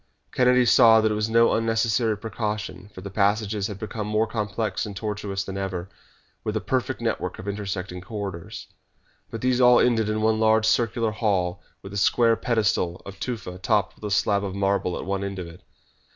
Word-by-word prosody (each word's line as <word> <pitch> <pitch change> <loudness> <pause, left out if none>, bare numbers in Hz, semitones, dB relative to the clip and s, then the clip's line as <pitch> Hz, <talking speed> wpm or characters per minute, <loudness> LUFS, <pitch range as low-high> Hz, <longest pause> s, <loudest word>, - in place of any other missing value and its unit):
Kennedy 125 0 +4
saw 115 -1 +7
that 110 0 +2
it - - +1
was 105 +1 -1
no 115 +1 +4
unnecessary 115 0 +1
precaution, 105 -3 -4
for 95 - -10
the 100 +1 -7
passages 100 0 +1
had 105 -3 -7
become 105 0 -5
more 105 +1 +1
complex 110 -1 -2
and 105 -2 -6
tortuous 100 -1 -3
than 95 0 -5
ever, 95 -2 -4 0.5
with - - -2
a - - 0
perfect - - -2
network - - -2
of 100 - -9
intersecting 95 -3 -4
corridors. 95 -3 -6 0.6
But 115 - -6
these 130 0 +2
all 125 -1 +7
ended 110 -3 +2
in 110 0 -1
one 110 0 +2
large 110 0 +3
circular 115 0 +1
hall 100 -4 -1 0.2
with 95 - -9
a - - -3
square 115 +3 +3
pedestal 105 -7 0
of 100 0 -10
tufa 100 -7 -5
topped 100 -1 +1
with - - -22
a - - -2
slab 100 0 +1
of 95 -1 -4
marble 100 -2 0
at - - -6
one 100 +1 -2
end 100 -1 -4
of 90 - -5
it. 85 +1 -12
105 Hz, 195 wpm, -24 LUFS, 95-110 Hz, 0.6 s, saw